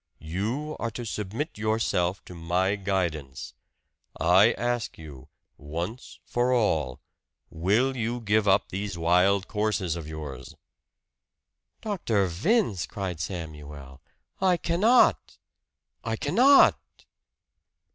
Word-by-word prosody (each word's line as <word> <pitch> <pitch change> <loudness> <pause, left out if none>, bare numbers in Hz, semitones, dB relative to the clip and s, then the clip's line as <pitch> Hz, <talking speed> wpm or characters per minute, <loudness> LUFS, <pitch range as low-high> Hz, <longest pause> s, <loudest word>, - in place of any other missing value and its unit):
"You 110 - -3
are 115 - -2
to 120 +2 -7
submit 105 - -4
yourself 110 -4 0
to - - -10
my 90 +4 0
guidance. 85 -9 -3 0.7
I 95 +7 +5
ask 120 -2 -2
you, 75 -5 -11 0.3
once 85 - -6
for 120 +1 0
all, 80 - +1 0.5
Will 105 +11 +1
you 120 0 -2
give 110 -1 +1
up 95 +1 +3
these 100 -1 -4
wild 90 +4 +2
courses 105 -5 -1
of 85 -3 -7
yours?" 75 -5 -8 1.3
"Dr. 145 - 0
Vince," 100 - 0
cried 95 -5 -5
Samuel, 75 -6 -7 0.4
"I 185 -2 +3
cannot! 205 +10 +3 0.7
I - - -2
cannot!" 275 +3 +5
100 Hz, 105 wpm, -26 LUFS, 85-115 Hz, 1.3 s, I